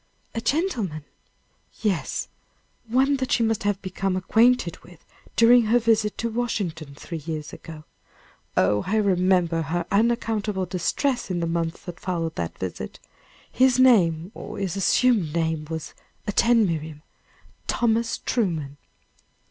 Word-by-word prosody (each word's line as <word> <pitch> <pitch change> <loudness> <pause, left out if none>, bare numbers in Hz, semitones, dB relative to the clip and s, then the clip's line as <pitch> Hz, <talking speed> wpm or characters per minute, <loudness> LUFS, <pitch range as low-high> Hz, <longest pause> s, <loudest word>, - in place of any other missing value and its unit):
"A 230 - -3
gentleman?" 230 - -1 0.8
"Yes; 200 -6 -1 0.6
one 265 +4 +2
that 260 -1 -3
she 235 - +3
must 225 -1 0
have 205 -1 0
become 185 0 -2
acquainted 225 -1 +2
with 175 -2 -18 0.3
during 235 0 +6
her 225 +3 +4
visit 220 -3 +1
to 230 - -1
Washington 180 -11 -3
three 165 +3 -7
years 155 -1 -6
ago. 155 -2 -10 0.7
Oh, 105 +2 +3
I 205 - 0
remember 185 -4 +2
her 165 +3 -2
unaccountable 215 -2 +1
distress 240 - -1
in 180 -2 -1
the 170 - -1
months 165 0 -2
that 175 -2 -8
followed 165 -3 -2
that 85 -1 -4
visit! 90 -8 -5 0.5
His 255 0 +4
name, 185 -9 +4
or - - -8
his 195 -2 -2
assumed 195 -4 +2
name, 160 -2 -1
was 160 -2 -5 0.3
attend, 230 +2 +3
Miriam! 155 -3 -4 0.6
Thomas 230 -1 +1
Truman." 160 - -2
190 Hz, 130 wpm, -24 LUFS, 165-230 Hz, 0.8 s, during